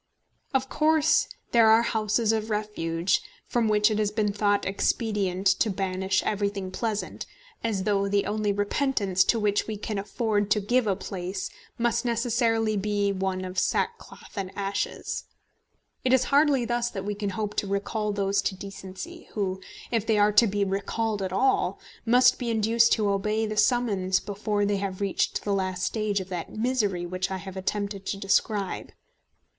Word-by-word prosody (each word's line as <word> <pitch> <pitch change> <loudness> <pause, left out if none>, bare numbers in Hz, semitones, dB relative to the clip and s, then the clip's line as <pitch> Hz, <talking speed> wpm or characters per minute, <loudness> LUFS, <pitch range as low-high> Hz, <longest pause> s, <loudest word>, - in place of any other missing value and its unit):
Of 265 -1 +1
course 310 +2 +3 0.2
there 230 -2 +6
are 225 +1 +6
houses 220 0 +1
of 220 0 -1
refuge, 190 -5 0 0.2
from 235 -2 +1
which 210 +1 +4
it 215 - 0
has 210 -1 +2
been 210 -1 0
thought 205 0 +1
expedient 195 -1 0
to 225 - +2
banish 190 -1 0
everything 200 -2 -2
pleasant, 215 0 -3 0.4
as 210 -5 -1
though 200 -1 +1
the 200 0 +1
only 210 0 0
repentance 205 -2 +1
to 230 - +2
which 205 -1 +1
we 215 -1 -3
can 210 0 -3
afford 205 0 -1
to 210 - +3
give 240 +3 +1
a 195 - +2
place 185 0 -5 0.3
must 235 0 +1
necessarily 230 -2 +1
be 205 0 0
one 190 -1 -2
of 185 0 -2
sackcloth 465 - -2
and 195 -3 -3
ashes. 200 0 -3 0.8
It 255 - +2
is 260 -1 +5
hardly 285 -4 +4
thus 240 0 0
that 195 -3 -6
we 205 - -1
can 205 0 -3
hope 210 +1 -3
to 205 - 0
recall 210 +2 -1
those 200 0 +1
to 195 - -2
decency 195 - -9
who, 190 -3 -2 0.3
if 225 -2 0
they 220 -2 +3
are 205 0 +5
to 210 +3 +6
be 205 0 0
recalled 200 +2 -1
at 190 -1 -2
all, 260 +8 +1 0.3
must 250 +2 +5
be 245 - -2
induced 230 +1 +3
to 210 -3 +1
obey 210 +3 0
the 215 0 -3
summons 210 -4 +2
before 205 0 -1
they 200 0 +1
have 195 -1 -4
reached 200 -2 0
the 205 - 0
last 185 -2 -1
stage 215 -2 0
of 190 0 -7
that 175 -3 -5
misery 215 -6 0
which 185 +1 -2
I 190 - -3
have 190 0 -8
attempted 200 +1 -3
to 195 - -2
describe. 200 0 0
205 Hz, 170 wpm, -26 LUFS, 195-225 Hz, 0.8 s, there